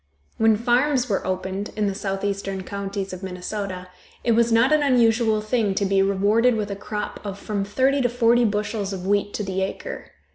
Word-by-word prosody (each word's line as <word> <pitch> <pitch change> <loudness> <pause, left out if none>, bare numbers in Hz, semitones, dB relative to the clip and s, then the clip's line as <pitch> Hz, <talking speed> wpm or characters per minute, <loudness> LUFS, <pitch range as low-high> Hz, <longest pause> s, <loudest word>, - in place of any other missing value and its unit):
When 220 -1 +4
farms 250 +3 +2
were 200 -4 -1
opened 190 +2 -3
in 215 -1 0
the 200 - 0
southeastern 195 -1 -3
counties 195 0 -4
of 185 - -7
Minnesota 185 0 -5 0.3
it 235 - +2
was 230 +1 +3
not 230 +5 +4
an 305 - +4
unusual 230 -5 +3
thing 215 -2 0
to 200 - +1
be 195 0 +2
rewarded 205 +5 +3
with 210 -2 -2
a - - -3
crop 210 +1 -5
of 200 -2 -5
from 200 -1 -3
thirty 265 +7 +1
to 245 - +2
forty 240 0 +3
bushels 210 -1 -1
of 185 -1 -6
wheat 205 +1 +1
to 210 - -2
the 190 -1 -2
acre. 195 - -5
205 Hz, 190 wpm, -23 LUFS, 195-230 Hz, 0.3 s, When